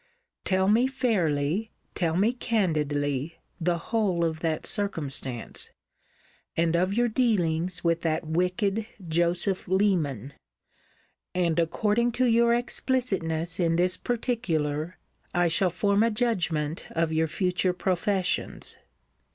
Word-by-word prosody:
Tell 190 0 +2
me 230 +5 +4
fairly, 200 - 0 0.2
tell 165 -2 0
me 215 +6 +3
candidly, 150 - -1 0.2
the 170 0 +1
whole 185 -3 0
of 160 -1 -2
that 160 -1 -1
circumstance; 140 - -2 0.9
and 165 0 +2
of 185 +3 +1
your 240 +1 +3
dealings 185 -7 0
with 170 -1 +1
that 160 +1 -1
wicked 180 +6 0 0.2
Joseph 175 +3 0
Leman; 165 - +1 1.0
and, 170 -2 +1
according 215 +8 +1
to 255 +2 +2
your 235 0 +4
explicitness 190 -10 -1
in 165 -2 +2
this 180 +2 +3
particular, 180 - -2 0.4
I 175 0 +3
shall 180 +3 +2
form 200 +3 +1
a 230 - +4
judgment 175 -10 -1
of 165 -1 -1
your 160 0 +2
future 180 +2 0
professions. 185 0 -1
180 Hz, 115 wpm, -27 LUFS, 160-210 Hz, 1.0 s, me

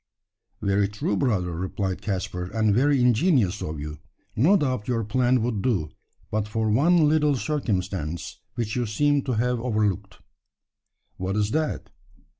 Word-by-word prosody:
"Very 100 0 +2
true, 105 0 -2
brother," 95 -7 0
replied 95 +2 -3
Caspar, 90 -3 -3
"and 110 -2 +3
very 140 +5 +3
ingenious 120 - +3
of 75 -1 -4
you. 75 +1 -6 0.4
No 170 - +5
doubt 130 - -1
your 115 -3 0
plan 125 +2 +2
would 115 -4 -1
do 95 -12 0 0.4
but 105 0 -1
for 110 0 0
one 155 +7 +4
little 150 -1 +3
circumstance, 95 - -3 0.2
which 115 -3 -2
you 120 -2 0
seem 145 +7 +2
to 130 - -1
have 120 +2 0
overlooked." 105 -5 -1 1.0
"What 95 +2 -2
is 105 0 +1
that?" 155 +1 -2
110 Hz, 145 wpm, -25 LUFS, 100-130 Hz, 1.0 s, No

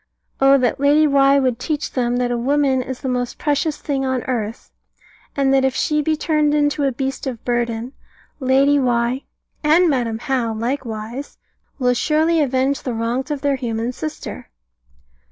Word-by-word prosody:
Oh 275 +1 +6
that 250 -1 0
Lady 290 +2 +4
Why 275 -1 +4
would 255 -3 +1
teach 300 +3 -3
them 245 -1 0
that 245 -1 0
a - - 0
woman 270 +1 +2
is 255 0 -6
the 270 - -4
most 250 -1 -2
precious 295 +1 0
thing 275 -2 -2
on 260 -2 -1
earth, 230 -3 -4 0.6
and 275 -1 +2
that 270 -1 +3
if 265 -1 +1
she 300 -3 +1
be 315 +1 +1
turned 300 -1 +1
into 290 -1 +1
a 270 - +2
beast 270 +2 -4
of 245 -4 -6
burden, 240 0 -2 0.5
Lady 275 +2 +3
Why 245 0 0 0.4
and 325 +4 +5
Madam 235 -4 -1
How 240 -3 -1
likewise 235 +1 -4 0.4
will 250 -2 +2
surely 315 +5 +2
avenge 270 0 0
the 250 -3 -3
wrongs 235 +5 -2
of 295 -2 -3
their 280 -1 +1
human 230 -1 -2
sister!" 310 +4 -7
265 Hz, 170 wpm, -20 LUFS, 245-285 Hz, 0.6 s, Oh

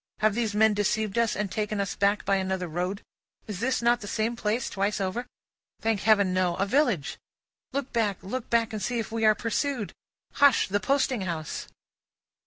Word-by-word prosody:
Have 215 -1 +4
these 220 -2 -1
men 220 0 +5
deceived 205 0 0
us, 230 -2 +2
and 205 -2 -2
taken 210 -1 -2
us 200 -1 -2
back 200 +1 +1
by 195 - +3
another 190 -1 -2
road? 180 +5 -3 0.4
Is 235 +5 -1
not 240 +1 +3
this 205 - -6
the - - -3
same 225 +2 0
place 225 +2 -1
twice 200 +2 -1
over? 200 +6 -2 0.5
Thank 220 -2 0
Heaven, 200 -2 +3
no. 180 -2 +1
A 195 - 0
village. 235 - +1 0.5
Look 275 -1 -3
back, 215 -5 +1
look 235 +5 -5
back, 230 -1 +2
and 215 - -3
see 240 +5 -1
if 225 -1 -3
we 225 -1 0
are 215 0 +6
pursued! 235 0 -2 0.4
Hush! 285 -3 +5
the 205 +1 0
posting 265 -2 +1
house. 165 -5 -4
210 Hz, 190 wpm, -27 LUFS, 195-235 Hz, 0.5 s, are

